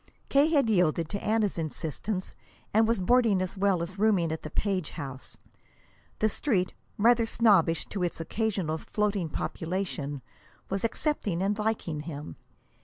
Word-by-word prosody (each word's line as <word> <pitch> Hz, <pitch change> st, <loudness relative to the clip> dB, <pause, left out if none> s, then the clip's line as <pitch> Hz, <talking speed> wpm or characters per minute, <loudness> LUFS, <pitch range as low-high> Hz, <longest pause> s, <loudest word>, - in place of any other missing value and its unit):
K. 280 Hz, +2 st, +5 dB
had 285 Hz, -6 st, +3 dB
yielded 175 Hz, -6 st, +2 dB
to 200 Hz, -, -4 dB
Anna's 215 Hz, -4 st, +1 dB
insistence, 165 Hz, +5 st, -3 dB, 0.4 s
and 220 Hz, +1 st, +5 dB
was 230 Hz, -2 st, +2 dB
boarding 225 Hz, 0 st, +4 dB
as 185 Hz, +1 st, -2 dB
well 195 Hz, -3 st, +2 dB
as 185 Hz, +3 st, -7 dB
rooming 200 Hz, -7 st, +3 dB
at 160 Hz, -, -3 dB
the 155 Hz, -, -6 dB
Page 185 Hz, -1 st, -1 dB
house. 135 Hz, -2 st, -7 dB, 0.8 s
The 215 Hz, -, +3 dB
Street, 205 Hz, -5 st, 0 dB, 0.2 s
rather 230 Hz, +1 st, +4 dB
snobbish 195 Hz, -9 st, +3 dB
to 200 Hz, -, -4 dB
its 175 Hz, -2 st, -1 dB
occasional 180 Hz, -3 st, -1 dB
floating 205 Hz, -4 st, -1 dB
population, 160 Hz, -5 st, -3 dB, 0.5 s
was 195 Hz, 0 st, -1 dB
accepting 220 Hz, -, -1 dB
and 200 Hz, +2 st, +1 dB
liking 210 Hz, -8 st, -1 dB
him. 150 Hz, -1 st, -7 dB
195 Hz, 145 wpm, -28 LUFS, 165-220 Hz, 0.8 s, K